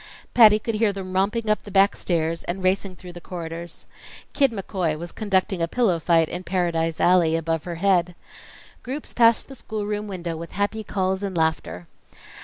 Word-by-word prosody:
Patty 215 -3 +8
could 225 +1 -3
hear 215 -1 +2
them 190 -2 -7
romping 210 +4 0
up 215 0 +2
the - - -11
back 195 0 +4
stairs, 165 -1 -1
and 185 +2 -4
racing 190 0 0
through 180 0 -11
the 175 - -10
corridors. 170 -1 -7 0.5
Kid 275 -3 +3
McCoy 185 -6 -2
was 170 +1 -7
conducting 190 -3 0
a 165 - +1
pillow 195 -4 +1
fight 165 -1 +3
in 180 - -6
Paradise 170 -3 -1
Alley 175 -3 +4
above 165 -1 -2
her 175 -1 -4
head. 180 -1 +1 0.7
Groups 275 +4 -6
passed 230 -1 +4
the 275 - -10
schoolroom 210 -3 -4
window 175 -4 -4
with 165 +1 -8
happy 205 +2 -1
calls 190 -1 -1
and 195 -3 -3
laughter. 160 - -1
185 Hz, 180 wpm, -23 LUFS, 170-205 Hz, 0.7 s, Patty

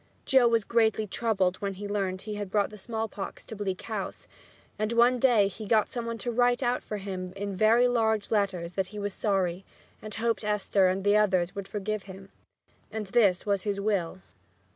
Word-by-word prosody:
Joe 260 -3 +5
was 230 -2 +2
greatly 220 -1 +2
troubled 195 -4 0
when 200 -1 -3
he 205 +2 -6
learned 195 -2 -2
he 215 - -5
had 205 -2 -4
brought 205 +1 +1
the 210 - -10
smallpox 220 -1 -5
to 220 - -8
Bleak 195 -3 -3
House, 215 -4 -5 0.5
and 215 +1 0
one 240 +2 +4
day 235 -6 +4
he 210 +2 -8
got 220 -1 +3
some 235 -2 -4
one 230 0 -3
to 240 +2 -2
write 245 +2 +2
out 245 0 +1
for 210 - -5
him 190 -2 -5
in 200 0 -4
very 225 +5 +5
large 220 -3 +1
letters 190 -5 0
that 190 0 -1
he 210 +3 -10
was 205 -1 -3
sorry 190 -3 0 0.4
and 215 -1 -5
hoped 230 0 -1
Esther 210 -2 +2
and 185 +1 0
all 205 - +5
the - - +4
others 185 -4 +2
would 200 -2 -6
forgive 210 0 -3
him. 190 +1 -10 0.6
And 220 -1 -4
this 195 -3 +3
was 200 -2 +1
his 200 +1 -2
will. 190 -3 -1
205 Hz, 205 wpm, -28 LUFS, 195-225 Hz, 0.6 s, Joe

